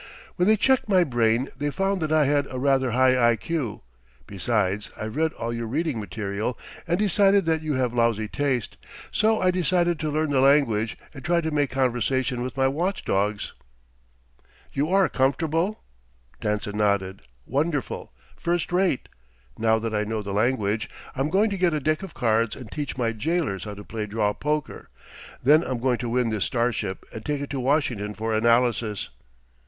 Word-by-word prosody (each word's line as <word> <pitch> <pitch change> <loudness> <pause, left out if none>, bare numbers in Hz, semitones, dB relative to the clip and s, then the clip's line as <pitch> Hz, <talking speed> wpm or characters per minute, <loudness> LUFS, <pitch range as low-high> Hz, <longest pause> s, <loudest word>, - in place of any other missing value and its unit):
When 180 0 +2
they 215 0 +5
checked 260 +1 +2
my 185 -3 +5
brain, 120 -3 +1
they 145 +2 -2
found 195 +5 -1
that 155 -1 -1
I 155 -2 +4
had 145 0 +2
a 130 - -5
rather 135 -1 +2
high 130 0 +4
I.Q. 125 - -3 0.4
Besides, 105 0 -1
I've 110 +1 -5
read 160 +1 +1
all 115 +1 -4
your 115 -1 -3
reading 145 0 -1
material 105 +2 -3 0.3
and 170 +1 +1
decided 200 -1 +3
that 160 -1 +1
you 155 -2 -2
have 125 -2 0
lousy 115 -2 +1
taste. 130 -3 -2 0.3
So 220 +1 +2
I 185 0 +3
decided 175 -2 +1
to 155 - -1
learn 155 0 0
the 135 -2 +3
language, 125 -6 +3 0.2
and 135 -3 -10
try 170 +2 +2
to 160 -1 -2
make 145 -2 +1
conversation 130 0 0
with 130 +2 -5
my 135 0 +3
watch 175 +8 -1
dogs." 105 +2 -1 1.2
"You 145 +3 0
are 195 0 +4
comfortable?" 165 +8 0 0.6
Danson 105 0 -2
nodded. 100 -2 0 0.2
"Wonderful. 145 +1 -2 0.2
First 175 0 -1
rate. 180 -6 +1 0.5
Now 110 0 +2
that 110 0 -3
I 105 0 +1
know 110 0 -3
the 100 -1 -4
language, 110 -1 0 0.3
I'm 135 +3 0
going 205 +5 +2
to 200 - -2
get 175 -3 +2
a - - 0
deck 155 +2 0
of 195 -4 -9
cards 115 -2 +1
and 125 -5 -10
teach 145 -3 -4
my 115 -3 +1
jailers 140 - -1
how 105 -1 -6
to 105 - -9
play 105 0 -5
draw 105 0 0
poker. 150 +2 -3 0.5
Then 150 +5 +6
I'm 130 -4 -2
going 125 0 0
to 120 - -3
win 120 -1 +1
this 105 -3 0
starship 115 -5 -1
and 110 - -7
take 145 +1 -2
it 145 - -5
to 140 - -2
Washington 125 -6 0
for 110 +1 -2
analysis." 115 -2 +2
130 Hz, 180 wpm, -25 LUFS, 110-155 Hz, 1.2 s, Then